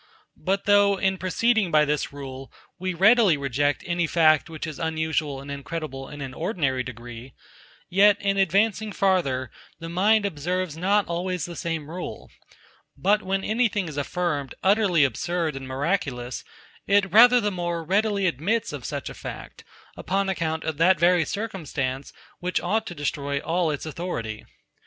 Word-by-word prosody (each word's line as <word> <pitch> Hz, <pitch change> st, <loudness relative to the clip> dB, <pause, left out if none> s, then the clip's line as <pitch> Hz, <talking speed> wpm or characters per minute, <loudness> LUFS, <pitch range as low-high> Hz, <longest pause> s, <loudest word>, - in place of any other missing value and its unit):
But 195 Hz, +1 st, 0 dB
though, 205 Hz, -1 st, +4 dB
in 190 Hz, -1 st, 0 dB
proceeding 220 Hz, +2 st, +1 dB
by 155 Hz, -2 st, +4 dB
this 150 Hz, 0 st, -1 dB
rule, 135 Hz, -1 st, -8 dB, 0.3 s
we 185 Hz, 0 st, -2 dB
readily 205 Hz, -2 st, +5 dB
reject 140 Hz, +1 st, 0 dB
any 175 Hz, -1 st, 0 dB
fact 160 Hz, -1 st, +4 dB
which 160 Hz, 0 st, -6 dB
is 155 Hz, -3 st, -7 dB
unusual 160 Hz, -3 st, -1 dB
and 140 Hz, +1 st, -8 dB
incredible 140 Hz, -1 st, -6 dB
in 145 Hz, -, -9 dB
an 135 Hz, -2 st, -6 dB
ordinary 150 Hz, -, -1 dB
degree; 120 Hz, 0 st, -9 dB, 0.5 s
yet 200 Hz, +2 st, +5 dB
in 200 Hz, 0 st, 0 dB
advancing 205 Hz, +3 st, +2 dB
farther, 170 Hz, -, +1 dB, 0.3 s
the 165 Hz, 0 st, -7 dB
mind 205 Hz, +5 st, +3 dB
observes 180 Hz, -1 st, -2 dB
not 195 Hz, +5 st, +2 dB
always 175 Hz, -1 st, -2 dB
the 175 Hz, -, -8 dB
same 165 Hz, -3 st, -3 dB
rule; 175 Hz, +3 st, -7 dB, 0.7 s
but 205 Hz, +9 st, +2 dB
when 195 Hz, 0 st, -2 dB
anything 215 Hz, -4 st, 0 dB
is 155 Hz, -, -7 dB
affirmed 145 Hz, -2 st, -2 dB
utterly 195 Hz, -5 st, +4 dB
absurd 165 Hz, +3 st, -1 dB
and 135 Hz, -1 st, -7 dB
miraculous, 130 Hz, -3 st, -2 dB, 0.4 s
it 200 Hz, -1 st, +3 dB
rather 245 Hz, +3 st, +8 dB
the 210 Hz, -2 st, 0 dB
more 175 Hz, -2 st, -3 dB
readily 200 Hz, +3 st, +1 dB
admits 185 Hz, -, 0 dB
of -, -, -6 dB
such -, -, -4 dB
a -, -, -6 dB
fact, -, -, -9 dB, 0.3 s
upon 195 Hz, +1 st, -1 dB
account 160 Hz, -3 st, -2 dB
of 160 Hz, -2 st, -3 dB
that 175 Hz, +1 st, +4 dB
very 175 Hz, -1 st, +4 dB
circumstance, 150 Hz, -, -4 dB, 0.3 s
which 180 Hz, +1 st, -1 dB
ought 220 Hz, +5 st, -1 dB
to 175 Hz, -, -6 dB
destroy 140 Hz, -1 st, -2 dB
all 170 Hz, +3 st, 0 dB
its 145 Hz, 0 st, -3 dB
authority. 145 Hz, -10 st, -5 dB
170 Hz, 155 wpm, -25 LUFS, 145-195 Hz, 0.7 s, rather